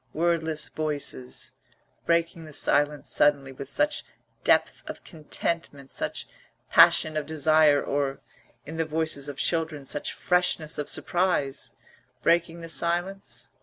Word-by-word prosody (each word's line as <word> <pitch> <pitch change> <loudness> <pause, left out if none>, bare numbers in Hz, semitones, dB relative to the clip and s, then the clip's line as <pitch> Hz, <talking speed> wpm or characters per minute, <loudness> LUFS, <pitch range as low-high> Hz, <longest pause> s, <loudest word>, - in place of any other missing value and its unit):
Wordless 160 -2 0
voices, 145 -4 -3 0.6
breaking 170 -1 +1
the 155 - -11
silence 145 +1 +2
suddenly 140 -2 +2
with 135 +1 -9
such 295 - +1 0.4
depth - - +2
of - - -8
contentment, 155 -3 -4
such - - -4 0.4
passion 155 -1 +6
of 150 -2 -2
desire, 155 -1 +4
or, 140 -1 -1 0.5
in 160 +3 -7
the 165 - 0
voices 155 -2 0
of 140 - -7
children, 160 -4 -1
such 145 +2 -3
freshness 180 -3 0
of 145 - -3
surprise; 175 -7 0 0.5
breaking 170 0 +2
the 165 - -8
silence? 175 +5 -2
155 Hz, 125 wpm, -26 LUFS, 145-170 Hz, 0.6 s, passion